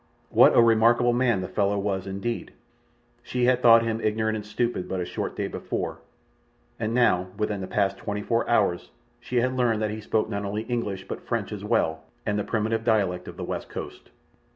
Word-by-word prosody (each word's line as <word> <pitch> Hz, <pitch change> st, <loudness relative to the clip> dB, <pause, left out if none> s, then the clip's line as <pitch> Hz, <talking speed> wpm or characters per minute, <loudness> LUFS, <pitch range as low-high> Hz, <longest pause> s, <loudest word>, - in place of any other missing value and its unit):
What -, -, +6 dB
a 120 Hz, -, +8 dB
remarkable 115 Hz, +2 st, +4 dB
man 120 Hz, -5 st, +2 dB
the 90 Hz, -, -4 dB
fellow 100 Hz, 0 st, 0 dB
was, 100 Hz, -1 st, -2 dB
indeed! 100 Hz, +5 st, -4 dB, 0.7 s
She 125 Hz, 0 st, -1 dB
had 125 Hz, 0 st, +3 dB
thought 115 Hz, -1 st, +7 dB
him 115 Hz, 0 st, -2 dB
ignorant 110 Hz, +1 st, 0 dB
and 105 Hz, -, -4 dB
stupid 115 Hz, -1 st, -2 dB
but 95 Hz, -, -2 dB
a 90 Hz, -, -2 dB
short -, -, -4 dB
day -, -, -2 dB
before, -, -, -4 dB, 0.8 s
and 115 Hz, +1 st, -1 dB
now, 95 Hz, -7 st, +3 dB
within 105 Hz, -2 st, -1 dB
the 95 Hz, -, -4 dB
past 100 Hz, -1 st, 0 dB
twenty 105 Hz, 0 st, -4 dB
four 115 Hz, +1 st, 0 dB
hours, 90 Hz, -7 st, +1 dB, 0.3 s
she 120 Hz, 0 st, -1 dB
had 130 Hz, +1 st, 0 dB
learned 120 Hz, -4 st, +2 dB
that 105 Hz, -, 0 dB
he 110 Hz, +1 st, -5 dB
spoke 110 Hz, 0 st, 0 dB
not 100 Hz, -2 st, -3 dB
only 105 Hz, +2 st, -3 dB
English 110 Hz, -6 st, -3 dB
but -, -, -5 dB
French -, -, -2 dB
as -, -, -6 dB
well, 80 Hz, 0 st, +1 dB, 0.2 s
and 105 Hz, -1 st, 0 dB
the -, -, -1 dB
primitive 115 Hz, +1 st, -1 dB
dialect 100 Hz, -6 st, +1 dB
of -, -, -9 dB
the -, -, -5 dB
West -, -, -5 dB
Coast. -, -, -8 dB
110 Hz, 200 wpm, -26 LUFS, 100-120 Hz, 0.8 s, a